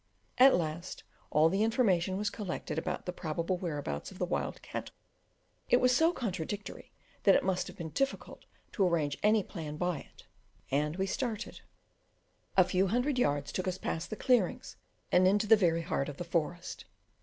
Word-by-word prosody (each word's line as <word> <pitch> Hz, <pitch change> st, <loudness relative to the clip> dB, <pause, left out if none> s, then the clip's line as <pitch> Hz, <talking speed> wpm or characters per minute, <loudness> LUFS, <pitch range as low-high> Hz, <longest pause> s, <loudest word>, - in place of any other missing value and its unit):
At 265 Hz, +1 st, +8 dB
last 170 Hz, +1 st, -3 dB, 0.3 s
all 155 Hz, +2 st, +4 dB
the 195 Hz, +5 st, +1 dB
information 195 Hz, -6 st, +2 dB
was 205 Hz, +1 st, -1 dB
collected 200 Hz, -5 st, -4 dB
about 180 Hz, 0 st, -4 dB
the 180 Hz, -, -3 dB
probable 170 Hz, +2 st, -2 dB
whereabouts 145 Hz, -, -4 dB
of -, -, -12 dB
the -, -, 0 dB
wild -, -, -2 dB
cattle -, -, -6 dB, 0.7 s
it -, -, +6 dB
was 250 Hz, 0 st, +4 dB
so 325 Hz, +5 st, +4 dB
contradictory, 205 Hz, -, -5 dB, 0.3 s
that 195 Hz, -, +6 dB
it -, -, +3 dB
must 185 Hz, -1 st, 0 dB
have -, -, -10 dB
been 160 Hz, -3 st, -6 dB
difficult 275 Hz, -, -3 dB, 0.3 s
to 200 Hz, -, +1 dB
arrange 155 Hz, -5 st, 0 dB
any 210 Hz, 0 st, +4 dB
plan 155 Hz, -6 st, -7 dB
by 175 Hz, -2 st, -1 dB
it, -, -, -16 dB, 0.5 s
and 150 Hz, +3 st, +1 dB
we 190 Hz, +1 st, 0 dB
started. 225 Hz, +2 st, -3 dB, 1.0 s
A 185 Hz, -, +9 dB
few 185 Hz, +2 st, +1 dB
hundred 250 Hz, +6 st, +1 dB
yards 145 Hz, -8 st, +1 dB
took 185 Hz, -, -3 dB
us 185 Hz, 0 st, -1 dB
past 165 Hz, -2 st, -3 dB
the 215 Hz, -, -4 dB
clearings 235 Hz, -6 st, +1 dB, 0.4 s
and 185 Hz, +1 st, +5 dB
into 205 Hz, +3 st, +3 dB
the 220 Hz, +1 st, +7 dB
very 170 Hz, -5 st, +2 dB
heart 155 Hz, -5 st, -1 dB
of 145 Hz, -, -8 dB
the -, -, -4 dB
forest. 170 Hz, +1 st, -3 dB
185 Hz, 180 wpm, -31 LUFS, 165-210 Hz, 1.0 s, A